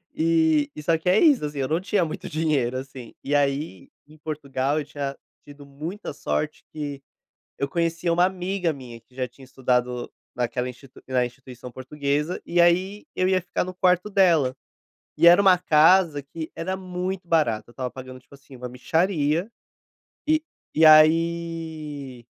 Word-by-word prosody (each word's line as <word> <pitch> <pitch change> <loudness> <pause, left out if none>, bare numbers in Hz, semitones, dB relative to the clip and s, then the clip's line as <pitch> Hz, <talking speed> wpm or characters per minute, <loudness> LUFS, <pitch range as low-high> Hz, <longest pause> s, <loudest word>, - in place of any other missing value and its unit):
e 160 -3 +2
e 150 - -8
só 165 +2 +2
que 180 +3 -1
é 195 - +5
isso, 290 - +4
assim, 145 -1 -4
eu 130 - 0
não 165 +3 0
tinha 190 -2 +1
muito 155 - -6
dinheiro 145 -6 0
assim, 130 -3 -9
e 145 +1 -1
aí 140 - -1 0.2
em 155 +1 -17
Portugal 145 -1 -2
eu 145 - -4
tinha 140 -2 -5 0.3
tido 145 0 -13
muita 155 +6 -7
sorte 150 +1 -3
que 145 -3 -6 0.6
eu 140 - 0
conhecia 170 +1 -1
uma 175 +2 +4
amiga 185 -2 -1
minha 125 -4 -10
que 120 +2 -31
já 130 -1 -3
tinha 130 +2 -16
estudado 125 -2 -1 0.2
naquela 125 +1 -2
institui 125 +1 -12
na 130 -1 +1
instituição 125 0 -9
portuguesa, 145 +5 -2
e 175 0 -1
aí 185 +4 +2
eu 185 - +1
ia 185 -1 +3
ficar 180 - -2
no 185 0 -6
quarto 180 +2 +2
dela. 170 -10 +3 0.7
E 170 - +5
era 175 +3 +7
uma 190 -2 +6
casa 165 -1 +4
que 160 +3 -8
era 185 +3 -3
muito 185 -1 -5
barata, 115 -10 +1
eu - - -15
estava 125 -1 -4
pagando 130 -1 -10
tipo 135 - -20
assim 135 -1 -15
uma 125 0 -7
mixaria, 160 - 0 0.8
e 310 0 +3 0.3
e 160 - +4
aí, 155 -4 +2
150 Hz, 170 wpm, -24 LUFS, 135-170 Hz, 0.8 s, era